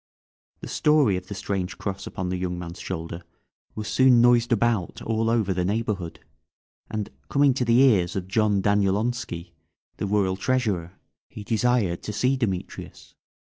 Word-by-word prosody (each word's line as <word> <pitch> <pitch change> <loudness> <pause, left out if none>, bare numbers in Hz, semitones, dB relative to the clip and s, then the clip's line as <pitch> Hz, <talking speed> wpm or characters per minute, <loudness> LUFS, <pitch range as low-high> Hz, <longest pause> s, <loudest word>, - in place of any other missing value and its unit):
The - - -7
story 150 -10 +3
of 90 0 -5
the 100 - -6
strange 95 -1 -3
cross 95 -1 -5
upon 90 -1 -4
the 90 - -2
young 90 -1 -3
man's 85 0 -7
shoulder 85 -1 -5 0.5
was 105 -1 -5
soon 130 -2 +5
noised 120 0 +4
about 115 -4 +1
all 115 0 0
over 110 -5 +1
the 90 0 -1
neighbourhood, 100 -3 -2 0.7
and 110 -2 -4 0.2
coming 140 -1 +4
to 125 - -1
the 120 +2 +4
ears 100 -10 +3
of 95 -2 -3
John 105 -1 +1
Danielonski, 100 -1 0 0.5
the - - -2
Royal 95 -2 +1
Treasurer, 100 -7 -1 0.4
he 105 - -9
desired 110 -5 +1
to 105 - -5
see 125 +6 +1
Demetrius. 100 -8 -5
105 Hz, 155 wpm, -25 LUFS, 95-120 Hz, 0.7 s, soon